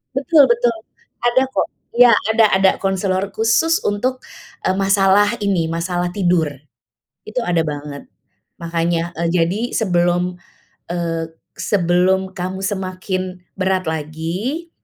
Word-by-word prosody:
Betul 285 +1 +5
betul. 235 0 +2 0.5
Ada 240 +2 +3
kok. - - 0 0.3
Iya 245 -1 +8 0.2
ada 220 0 +5
ada 190 0 +5
konselor 195 0 -1
khusus 230 +9 +2
untuk, 255 +6 -1 0.4
eee, 185 - +1
masalah 195 +2 +3
ini, 195 -5 +1
masalah 175 +2 -2
tidur, 175 -4 +2 0.8
itu 220 +4 -2
ada 175 -4 +1
banget. 145 -1 -6 0.5
Makannya 170 0 -1
eee, 170 +1 -1
jadi 180 +4 +1
sebelum 175 -3 +1 0.5
eee, 165 -1 -2 0.3
sebelum 190 0 +1
kamu 185 +1 -5
semakin 185 -2 -3 0.2
berat 190 0 +1
lagi, 165 - -4
185 Hz, 115 wpm, -19 LUFS, 175-205 Hz, 0.8 s, Iya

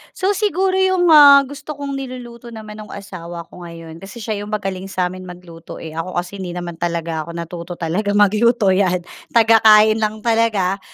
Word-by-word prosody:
So 380 +2 0
siguro 385 -2 0
'yung, 375 -3 +3
ah, 285 -2 +8
gusto 285 +2 -8
kong 280 0 -6
niluluto 245 -3 -9
naman 215 -1 -10
no'ng 215 - -9
asawa 175 -4 -8
ko 175 -1 -10
ngayon 165 -1 -11
kasi 195 +3 -10
siya 215 -2 -3
'yung 205 - -7
magaling 195 -3 -4
sa 185 -2 -2
amin 185 0 -10
magluto, 175 -2 -11
eh, 160 - -8
ako 165 +3 -6
kasi 175 +3 -4
hindi 180 -2 -6
naman 175 -2 -6
talaga 170 -2 -3
ako 170 - -8
natuto 170 +1 -7
talaga 190 +5 -2
magluto, 210 +1 +3
'yan, 185 -2 +1 0.2
tagakain 220 -1 +5
lang 215 0 -3
talaga. 220 -5 +1
205 Hz, 180 wpm, -19 LUFS, 175-235 Hz, 0.2 s, ah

